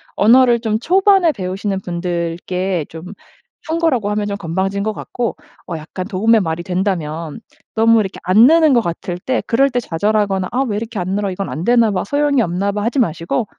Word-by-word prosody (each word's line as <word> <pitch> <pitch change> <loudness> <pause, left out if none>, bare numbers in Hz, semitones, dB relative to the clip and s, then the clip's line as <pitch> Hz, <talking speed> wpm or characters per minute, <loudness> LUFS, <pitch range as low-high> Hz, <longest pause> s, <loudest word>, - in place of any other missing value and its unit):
언어를 240 +2 +5
좀 220 -2 -1
초반에 380 - +3
배우시는 190 0 -3
분들께 175 0 -3
좀 160 0 -10 0.6
충고라고 315 -10 0
하면 210 0 -1
좀 200 -1 -3
건방진 195 +3 -2
것 215 +1 -1
같고 240 +2 -4 0.3
어 170 - -4
약간 160 +4 -7
도움의 220 +3 +3
말이 165 -1 -3
된다면 175 -3 -3 0.3
너무 225 0 +4
이렇게 195 -3 -3
안 190 +6 +5
느는 320 0 +5
것 240 - +5
같을 175 -1 -4
때 255 +7 -1
그럴 270 +4 +3
때 250 -2 -1
좌절하거나 200 0 0
'아. 250 - -1
왜 205 -3 -2
이렇게 225 0 -5
안 180 0 -3
늘어? 205 -1 -1
이건 195 +1 -4
안 160 - -5
되나 235 -2 +4
봐. 185 -2 -1
소용이 285 +2 +1
없나 195 +1 -1
봐.' 205 0 -3
하지 240 +5 0
마시고 170 +2 -1
205 Hz, 370 characters per minute, -18 LUFS, 180-235 Hz, 0.6 s, 언어를